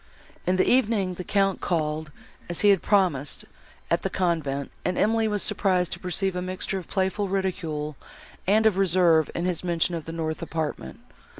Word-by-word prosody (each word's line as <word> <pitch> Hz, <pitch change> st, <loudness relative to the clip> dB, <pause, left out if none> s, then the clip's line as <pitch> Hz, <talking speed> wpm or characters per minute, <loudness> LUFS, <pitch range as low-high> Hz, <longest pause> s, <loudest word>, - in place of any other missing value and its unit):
In 180 Hz, -, +3 dB
the 185 Hz, -, +2 dB
evening, 215 Hz, -7 st, +2 dB
the 180 Hz, -, -6 dB
Count 195 Hz, 0 st, +1 dB
called, 155 Hz, -2 st, -1 dB, 0.4 s
as 175 Hz, -, -2 dB
he 205 Hz, -, +5 dB
had 195 Hz, -4 st, +5 dB
promised, 175 Hz, -9 st, +1 dB, 0.5 s
at -, -, +2 dB
the -, -, -1 dB
convent, 155 Hz, -6 st, -1 dB
and 180 Hz, -, -1 dB
Emily 225 Hz, +1 st, +2 dB
was 210 Hz, -2 st, 0 dB
surprised 180 Hz, -3 st, +1 dB
to -, -, -4 dB
perceive 190 Hz, +1 st, 0 dB
a 180 Hz, -, -2 dB
mixture 185 Hz, +2 st, -2 dB
of 180 Hz, -, -11 dB
playful 190 Hz, +1 st, -1 dB
ridicule 165 Hz, -6 st, -2 dB, 0.5 s
and 215 Hz, +3 st, +4 dB
of 205 Hz, -3 st, +3 dB
reserve 170 Hz, -4 st, +4 dB
in 170 Hz, -, -1 dB
his 180 Hz, -2 st, -1 dB
mention 175 Hz, 0 st, 0 dB
of 165 Hz, -2 st, -4 dB
the 165 Hz, -, -6 dB
north 160 Hz, -1 st, -3 dB
apartment. 155 Hz, -, -4 dB
180 Hz, 180 wpm, -25 LUFS, 160-195 Hz, 0.5 s, he